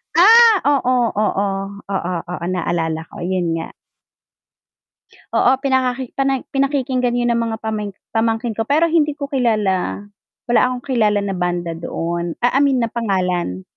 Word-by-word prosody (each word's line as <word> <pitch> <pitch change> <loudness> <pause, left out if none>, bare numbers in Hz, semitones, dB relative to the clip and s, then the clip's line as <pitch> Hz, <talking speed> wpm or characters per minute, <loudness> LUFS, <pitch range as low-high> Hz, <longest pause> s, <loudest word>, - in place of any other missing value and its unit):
Ah! 445 +3 +7
oo, 255 -3 +2 0.2
oo, 215 - +2 0.6
oo, 185 -2 -2 0.2
oo, 180 -1 -4
naalala 165 -2 -1
ko, - - -12
yun 175 -3 -1
nga. 165 - -6 1.6
Oo, - - +3
pinakaki 260 -2 0
pani 270 -1 0
pinakikinggan 265 -3 0
yun 240 0 +1
ng 235 - +1
mga 230 -1 -2
pamangk 210 -3 -3 0.2
pamangkin 225 +1 0
ko 225 0 -2
pero 320 +4 +3
hindi 300 -3 +2
ko 280 -1 -5
kilala, 210 -7 0 0.5
wala 240 - +4
akong 250 -1 -4
kilala 215 -6 +1
na 200 - -2
banda 175 -1 -2
doon 170 0 -3
ah, 245 - +4
I - - +4
mean 275 -3 +3
na 230 - -2
pangalan. 180 - -1
230 Hz, 150 wpm, -19 LUFS, 185-265 Hz, 1.6 s, Ah